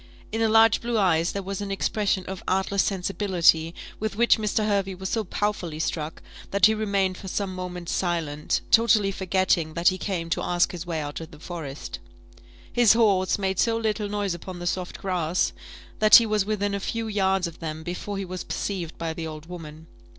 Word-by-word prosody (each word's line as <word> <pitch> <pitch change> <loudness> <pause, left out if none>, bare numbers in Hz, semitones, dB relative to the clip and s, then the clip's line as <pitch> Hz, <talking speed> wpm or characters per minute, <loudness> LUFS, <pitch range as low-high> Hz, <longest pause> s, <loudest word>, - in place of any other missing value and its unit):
In 225 - -2
her 225 - +3
large 225 +1 +5
blue 235 -1 -1
eyes 170 -4 +2
there 200 - -4
was 195 +1 -4
an 200 - -4
expression 195 -1 0
of 190 -1 -6
artless 195 +1 +1
sensibility 180 -4 +2 0.2
with 215 -1 -3
which 235 +1 +4
Mr. 215 0 0
Hervey 195 -2 0
was 190 +1 -5
so 225 - 0
powerfully 190 -5 -2
struck 160 0 -3 0.3
that 200 -1 +4
he 220 - +5
remained 200 -4 0
for 195 - -8
some 190 0 -2
moments 180 -1 -5
silent, 165 -5 -1
totally 220 -3 +5
forgetting 185 -4 0
that 170 +1 +4
he 185 0 -4
came 170 -4 -3
to - - +1
ask 175 0 +1
his 175 -1 -7
way 165 -2 -2
out 145 +2 -5
of 160 - -8
the - - -13
forest. 155 -4 -7 0.7
His 240 -4 +6
horse 200 -5 +3
had - - -7
made 190 -1 -1
so 230 -1 +2
little 215 -2 -1
noise 205 -2 -1
upon 175 +2 -7
the 175 - -6
soft 180 0 -2
grass, 180 -2 0 0.5
that 215 0 +8
he 235 - +9
was 215 -2 +1
within 205 -1 -1
a 200 - -1
few 225 +3 -3
yards 195 -3 +1
of 170 -1 -7
them 160 -1 -5
before 180 +4 -4
he 195 - -3
was 185 0 -5
perceived 180 -5 -4
by 165 -1 -3
the 160 0 -5
old 155 0 -8
woman. 160 -3 -9
190 Hz, 200 wpm, -25 LUFS, 170-205 Hz, 0.7 s, he